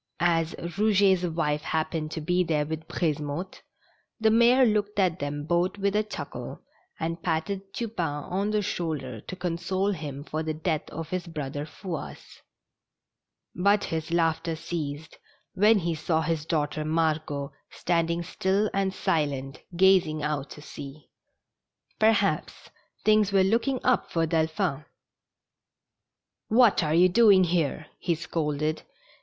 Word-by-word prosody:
As 165 Hz, -1 st, +2 dB
Eouget's 190 Hz, 0 st, +2 dB
wife 150 Hz, -3 st, -1 dB
happened 160 Hz, 0 st, -2 dB
to 160 Hz, -, -5 dB
be 180 Hz, +4 st, +2 dB
there 155 Hz, -3 st, 0 dB
with 160 Hz, +1 st, -5 dB
Brisemotte, 155 Hz, +2 st, -3 dB, 0.6 s
the 220 Hz, 0 st, +4 dB
mayor 240 Hz, +3 st, +6 dB
looked 210 Hz, -2 st, 0 dB
at 185 Hz, -3 st, +2 dB
them 145 Hz, 0 st, -3 dB
both 175 Hz, +4 st, +1 dB
with 200 Hz, 0 st, 0 dB
a 210 Hz, -, +4 dB
chuckle, 215 Hz, -, -7 dB, 0.4 s
and 165 Hz, +1 st, -3 dB
patted 190 Hz, +4 st, -2 dB
Tupain 170 Hz, -12 st, -3 dB
on 195 Hz, +3 st, 0 dB
the 210 Hz, -1 st, +1 dB
shoulder 145 Hz, -, -3 dB
to -, -, -8 dB
console 185 Hz, +2 st, -1 dB
him 145 Hz, -6 st, -5 dB
for 155 Hz, +1 st, -3 dB
the 155 Hz, -1 st, -3 dB
death 155 Hz, -1 st, -2 dB
of 165 Hz, 0 st, -7 dB
his 185 Hz, -1 st, -3 dB
brother 145 Hz, -2 st, -5 dB
Fouasse. 165 Hz, 0 st, -8 dB, 1.1 s
But 200 Hz, +3 st, +3 dB
his 160 Hz, 0 st, -3 dB
laughter 165 Hz, -1 st, +1 dB
ceased 160 Hz, -2 st, -5 dB, 0.3 s
when 210 Hz, +3 st, +5 dB
he 170 Hz, -3 st, -1 dB
saw 160 Hz, +1 st, 0 dB
his 160 Hz, -1 st, -2 dB
daughter 155 Hz, -2 st, -1 dB
Margot 155 Hz, -3 st, -1 dB, 0.2 s
stand 170 Hz, -1 st, 0 dB
ing 170 Hz, +1 st, -1 dB
still 190 Hz, +4 st, 0 dB
and 195 Hz, -1 st, 0 dB
silent, 145 Hz, -8 st, -1 dB, 0.2 s
gazing 180 Hz, -5 st, +4 dB
out 150 Hz, -2 st, -2 dB
to 150 Hz, -, -11 dB
sea. 145 Hz, 0 st, -10 dB, 0.9 s
Perhaps 205 Hz, -7 st, +1 dB, 0.3 s
things 215 Hz, -2 st, +4 dB
were 195 Hz, -1 st, +4 dB
looking 235 Hz, +7 st, +1 dB
up 255 Hz, -1 st, +2 dB
for 165 Hz, -1 st, +1 dB
Delphi 160 Hz, 0 st, 0 dB
n. 150 Hz, -, -17 dB, 1.6 s
"What 230 Hz, -1 st, +5 dB
are 155 Hz, -1 st, +1 dB
you 180 Hz, +2 st, +6 dB
doing 200 Hz, -1 st, +6 dB
here? 165 Hz, -3 st, 0 dB
" -, -, -42 dB
he 170 Hz, -, 0 dB
scolded. 155 Hz, -1 st, -2 dB
165 Hz, 140 wpm, -27 LUFS, 155-195 Hz, 1.6 s, mayor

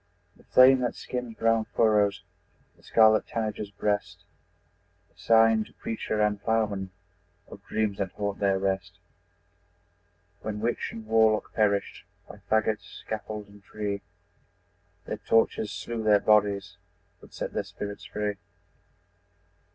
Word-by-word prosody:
The -, -, -22 dB
flame 130 Hz, +1 st, +6 dB
that 125 Hz, -1 st, -1 dB
skims 125 Hz, -3 st, -6 dB
brown 115 Hz, -1 st, +2 dB
furrows 105 Hz, -3 st, +3 dB, 0.5 s
The -, -, -25 dB
scarlet 110 Hz, -1 st, +4 dB
tanager's 110 Hz, -2 st, -3 dB
breast, 105 Hz, 0 st, -2 dB, 0.9 s
Is -, -, -19 dB
sign 115 Hz, -1 st, +5 dB
to -, -, -19 dB
preacher 110 Hz, -1 st, -4 dB
and 105 Hz, -1 st, +1 dB
ploughman 105 Hz, -4 st, 0 dB, 0.6 s
Of -, -, -12 dB
dreams 105 Hz, -2 st, -1 dB
that 95 Hz, -2 st, -2 dB
haunt 100 Hz, -1 st, -3 dB
their 100 Hz, -1 st, +2 dB
rest. 95 Hz, -1 st, -2 dB, 1.5 s
When 105 Hz, -1 st, -4 dB
witch 115 Hz, +2 st, -1 dB
and 110 Hz, -1 st, -9 dB
warlock 110 Hz, -1 st, +2 dB
perished 100 Hz, -2 st, 0 dB, 0.2 s
By -, -, -11 dB
fagot, 110 Hz, -1 st, +2 dB
scaffold 105 Hz, +1 st, -7 dB
and 100 Hz, 0 st, -17 dB
tree, 100 Hz, -1 st, -4 dB, 1.0 s
Their -, -, -4 dB
tortures 110 Hz, -2 st, +1 dB
slew 110 Hz, +3 st, -5 dB
their 105 Hz, -1 st, +4 dB
bodies 100 Hz, -2 st, +2 dB, 0.4 s
But -, -, -17 dB
set -, -, -4 dB
their -, -, -1 dB
spirits 100 Hz, 0 st, -7 dB
free! 105 Hz, -1 st, -3 dB
105 Hz, 130 wpm, -27 LUFS, 100-110 Hz, 1.5 s, flame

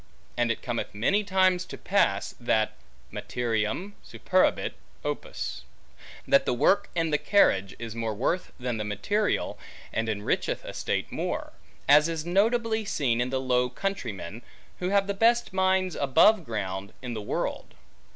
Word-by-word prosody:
And 120 Hz, -1 st, +2 dB
it 115 Hz, -, -4 dB
cometh 120 Hz, -4 st, -3 dB
many 190 Hz, -, +2 dB
times 185 Hz, -2 st, +3 dB
to -, -, -8 dB
pass, 100 Hz, -, +1 dB
that 110 Hz, -2 st, +1 dB, 0.4 s
materiam 120 Hz, -, -2 dB
superabit -, -, +1 dB, 0.3 s
opus; -, -, -4 dB, 0.7 s
that 275 Hz, -, +4 dB
the 125 Hz, -, +2 dB
work 195 Hz, +10 st, +3 dB
and 165 Hz, -2 st, 0 dB
carriage 100 Hz, -, +3 dB
is 115 Hz, -2 st, -6 dB
more 115 Hz, -2 st, -3 dB
worth 165 Hz, -, -1 dB
than 125 Hz, -2 st, -2 dB
the 105 Hz, -, -2 dB
material, 105 Hz, -, -1 dB, 0.3 s
and 110 Hz, 0 st, -1 dB
enricheth 105 Hz, -1 st, -1 dB
a -, -, -6 dB
state -, -, -2 dB
more; -, -, -3 dB, 0.3 s
as 150 Hz, +3 st, +6 dB
is 165 Hz, -1 st, -3 dB
notably 220 Hz, +4 st, +2 dB
seen 125 Hz, -, 0 dB
in 125 Hz, -, 0 dB
the 130 Hz, 0 st, -1 dB
Low 125 Hz, -1 st, +1 dB
Countrymen, 120 Hz, -, -4 dB, 0.4 s
who 180 Hz, -, -1 dB
have 200 Hz, 0 st, +3 dB
the 200 Hz, -, -1 dB
best 230 Hz, +2 st, +2 dB
mines 190 Hz, -1 st, +2 dB
above 160 Hz, +8 st, +4 dB
ground, 100 Hz, -3 st, -4 dB
in 125 Hz, -2 st, -4 dB
the 110 Hz, -, -4 dB
world. 105 Hz, -, -3 dB
135 Hz, 150 wpm, -27 LUFS, -, 0.7 s, as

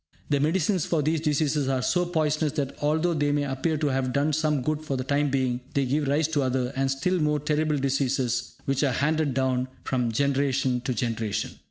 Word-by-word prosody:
The 145 Hz, -, +3 dB
medicines 170 Hz, +4 st, +1 dB
for 160 Hz, -3 st, +1 dB
these 155 Hz, +1 st, +1 dB
diseases 150 Hz, -2 st, +1 dB
are 130 Hz, -2 st, 0 dB
so 180 Hz, +3 st, +1 dB
poisonous 155 Hz, -3 st, 0 dB
that, 140 Hz, -3 st, -2 dB
although 160 Hz, +4 st, +1 dB
they 145 Hz, -2 st, +1 dB
may 145 Hz, 0 st, +1 dB
appear 145 Hz, +4 st, -1 dB
to 150 Hz, -, -1 dB
have 130 Hz, -1 st, 0 dB
done 145 Hz, +3 st, +1 dB
some 150 Hz, -3 st, +1 dB
good 155 Hz, +2 st, -1 dB
for 140 Hz, -4 st, -2 dB
the 130 Hz, -, -2 dB
time 145 Hz, +2 st, +1 dB
being, 130 Hz, -2 st, 0 dB
they 140 Hz, -1 st, +2 dB
give 145 Hz, +3 st, 0 dB
rise 145 Hz, +2 st, +2 dB
to 155 Hz, -3 st, +1 dB
other 130 Hz, -1 st, -1 dB
and 135 Hz, 0 st, +1 dB
still 160 Hz, +7 st, 0 dB
more 150 Hz, -1 st, +1 dB
terrible 150 Hz, +1 st, 0 dB
diseases 130 Hz, -3 st, 0 dB
which 135 Hz, +1 st, 0 dB
are 135 Hz, -3 st, +2 dB
handed 150 Hz, 0 st, +1 dB
down 130 Hz, -1 st, +1 dB, 0.2 s
from 125 Hz, -3 st, 0 dB
generation 135 Hz, 0 st, +1 dB
to 125 Hz, -, -1 dB
generation. 115 Hz, -4 st, -2 dB
140 Hz, 205 wpm, -26 LUFS, 130-155 Hz, 0.2 s, The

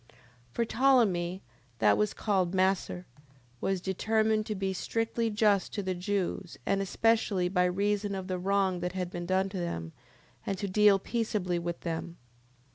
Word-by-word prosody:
10:12. -, -, -23 dB, 0.4 s
For 235 Hz, -, +1 dB
Ptolemee, 215 Hz, -9 st, +2 dB, 0.4 s
that 105 Hz, -2 st, +4 dB
was 105 Hz, 0 st, 0 dB
called 190 Hz, -4 st, 0 dB
Macer, 185 Hz, -1 st, +1 dB, 0.5 s
was 195 Hz, +5 st, 0 dB
determined 215 Hz, +3 st, +1 dB
to 215 Hz, -, -2 dB
be 190 Hz, 0 st, -1 dB
strictly 225 Hz, +4 st, -1 dB
just 210 Hz, -3 st, +2 dB
to 205 Hz, -, -2 dB
the 185 Hz, 0 st, -1 dB
Jews 185 Hz, -1 st, -3 dB
and 195 Hz, 0 st, +1 dB
especially 200 Hz, -2 st, +1 dB
by 180 Hz, -1 st, +2 dB
reason 200 Hz, +2 st, 0 dB
of 190 Hz, -1 st, -4 dB
the 185 Hz, -1 st, -2 dB
wrong 190 Hz, -1 st, +1 dB
that 180 Hz, +1 st, -3 dB
had 180 Hz, -1 st, -3 dB
been 175 Hz, -1 st, -5 dB
done 190 Hz, +1 st, +1 dB
them, 170 Hz, -, -4 dB, 0.5 s
and 195 Hz, -, -2 dB
to 200 Hz, -, -3 dB
deal 205 Hz, +1 st, +5 dB
peaceably 195 Hz, -4 st, -1 dB
with 170 Hz, 0 st, -4 dB
them. 170 Hz, 0 st, -4 dB
190 Hz, 160 wpm, -29 LUFS, 180-210 Hz, 0.5 s, deal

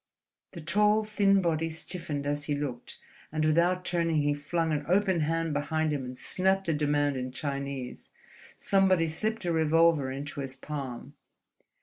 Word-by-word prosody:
The 170 Hz, -, -8 dB
tall, 210 Hz, +6 st, +3 dB
thin 200 Hz, -2 st, +2 dB
body 165 Hz, -1 st, 0 dB
stiffened 160 Hz, -3 st, -4 dB
as 145 Hz, +1 st, -1 dB
he 145 Hz, -, -1 dB
looked, 135 Hz, -4 st, -5 dB, 0.3 s
and 155 Hz, 0 st, 0 dB
without 175 Hz, +4 st, +2 dB
turning 165 Hz, -4 st, +1 dB
he 145 Hz, 0 st, +2 dB
flung 160 Hz, +3 st, -1 dB
an 150 Hz, -1 st, -1 dB
open 190 Hz, 0 st, +2 dB
hand 165 Hz, +1 st, 0 dB
behind 155 Hz, +1 st, 0 dB
him 140 Hz, -2 st, -2 dB
and 125 Hz, 0 st, -8 dB
snapped 190 Hz, +4 st, 0 dB
a 165 Hz, -, +2 dB
demand 145 Hz, -2 st, +1 dB
in 130 Hz, 0 st, -4 dB
Chinese. 140 Hz, -1 st, -5 dB, 0.5 s
Somebody 190 Hz, -3 st, +3 dB
slipped 215 Hz, +6 st, -2 dB
a 175 Hz, -, +1 dB
revolver 160 Hz, -3 st, +3 dB
into 140 Hz, +2 st, -6 dB
his 135 Hz, -1 st, -5 dB
palm. 135 Hz, -3 st, -6 dB
155 Hz, 155 wpm, -29 LUFS, 145-175 Hz, 0.5 s, tall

